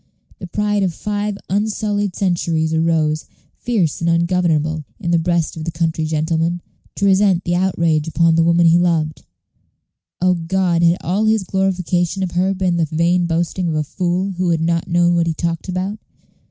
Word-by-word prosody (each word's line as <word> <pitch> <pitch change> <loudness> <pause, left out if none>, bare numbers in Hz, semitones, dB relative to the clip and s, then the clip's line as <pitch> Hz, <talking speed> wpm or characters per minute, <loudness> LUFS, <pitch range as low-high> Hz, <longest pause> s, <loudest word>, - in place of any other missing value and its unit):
The 180 - -7
pride 210 +2 0
of 180 -4 -1
five 210 -1 -3
unsullied 205 -1 -1
centuries 165 -4 0
arose, 160 -1 +1 0.3
fierce 195 -12 -1
and 170 - +1
ungovernable, 165 -3 +1 0.2
in 170 -5 -2
the 170 - +3
breast 170 -1 0
of 160 - -6
the 165 - -3
country 160 0 -1
gentleman, 160 +2 -1 0.3
to 200 - -1
resent 190 -2 +3
this 175 - -1
outrage 170 -4 +1
upon 165 0 +2
the 165 - +3
woman 170 +1 +3
he 165 +1 +5
loved. 155 -4 0 1.0
O 185 +1 +3
God, 175 0 0
had 170 +1 +4
all 195 +6 0
his 220 -2 +2
glorification 185 -1 -1
of 180 - -3
her 185 +3 0
been 185 -2 0
the 165 - +2
vain 170 +3 +1
boasting 170 +2 -1
of 160 - -1
a 155 - 0
fool 180 +4 -2
who 180 -1 0
had 165 -1 +1
not 165 0 0
known 175 0 +2
what 170 -1 +1
he 165 - -1
talked 170 +2 -3
about? 190 +3 -3
175 Hz, 180 wpm, -19 LUFS, 165-190 Hz, 1.0 s, he